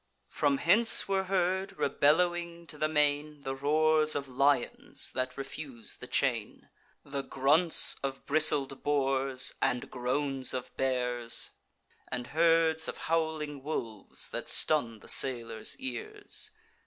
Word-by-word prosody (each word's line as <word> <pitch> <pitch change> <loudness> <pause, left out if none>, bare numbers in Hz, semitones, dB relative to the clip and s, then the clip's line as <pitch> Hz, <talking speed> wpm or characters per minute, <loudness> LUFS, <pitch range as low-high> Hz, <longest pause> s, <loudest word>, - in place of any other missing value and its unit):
From 280 - +1
hence 235 -4 +5
were 195 -1 0
heard, 190 +1 -1
rebellowing 170 +4 +1
to 155 - -9
the 155 - +1
main, 150 -1 0
The 135 - -3
roars 155 +2 +2
of 140 -1 -3
lions 135 0 0
that 130 0 -3
refuse 135 -3 -5
the - - -10
chain, - - -2 0.3
The 140 0 -4
grunts 150 +6 +3
of 135 -1 -5
bristled 145 -3 +2
boars, 135 -2 +2
and 125 - -1
groans 130 +1 -1
of 130 0 -6
bears, 125 -2 -1 0.6
And 125 0 -3
herds 165 0 +3
of - - -5
howling 160 -3 -2
wolves 115 -8 -3
that - - -5
stun 115 -8 +1
the - - -15
sailors' 115 -4 +1
ears. 125 -3 -5
145 Hz, 125 wpm, -30 LUFS, 130-160 Hz, 0.6 s, hence